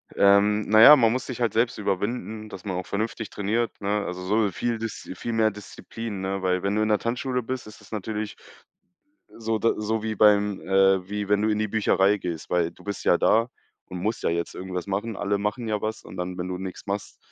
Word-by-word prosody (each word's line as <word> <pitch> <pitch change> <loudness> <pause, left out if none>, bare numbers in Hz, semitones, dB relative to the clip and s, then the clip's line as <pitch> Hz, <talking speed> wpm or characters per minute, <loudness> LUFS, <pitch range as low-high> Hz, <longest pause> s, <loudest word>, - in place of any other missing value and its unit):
Ähm, 100 +2 +4
na 110 +1 +6
ja, 150 +5 +11
man 115 -5 +4
muss 125 +2 -2
sich 125 -2 -6
halt 115 -3 +2
selbst 115 +1 +1
überwinden, 105 +2 -3
dass 95 - -10
man 95 -3 -3
auch 90 - -4
vernünftig 110 +1 -3
trainiert, 110 +3 -1
ne? 100 +1 0
Also, 90 +1 -5
so 105 +1 +2
viel 120 +4 -2
Diszi 110 -4 -6
viel 115 +5 -4
mehr 110 -1 +3
Disziplin, 105 0 -7
ne, 95 0 -2
weil 90 0 0
wenn 100 +1 0
du 110 - +1
in 110 - +2
'ner 105 - +3
Tanzschule 125 +1 -2
bist, 130 -2 -5
ist 110 0 -13
es 100 - -18
natürlich 110 0 -4 1.0
so 115 -1 -1
da 115 - +2
so 110 +1 -1
wie 110 0 -2
beim 105 -1 +4
äh, 95 -1 +3
wie 105 -1 -3
wenn 105 0 +4
du 110 - +1
in 105 - +1
die 110 -1 0
Bücherei 105 -1 +2
gehst, 85 -4 -5
weil 85 -2 +1
du - - -18
bist 100 -1 -5
ja 85 - +5
da 115 +6 +3 0.4
und 90 -1 -7
musst 110 +5 -2
ja - - +1
jetzt 85 0 -2
irgendwas 90 -1 -5
machen. 100 +2 -3
Alle 100 0 0
machen 105 +4 -2
ja 105 -2 -1
was 110 0 -4
und - - -11
dann, 90 0 -4
wenn 90 0 -4
du 90 - -4
nix 95 -1 -6
machst, 100 0 -4
105 Hz, 230 wpm, -25 LUFS, 95-110 Hz, 1.0 s, ja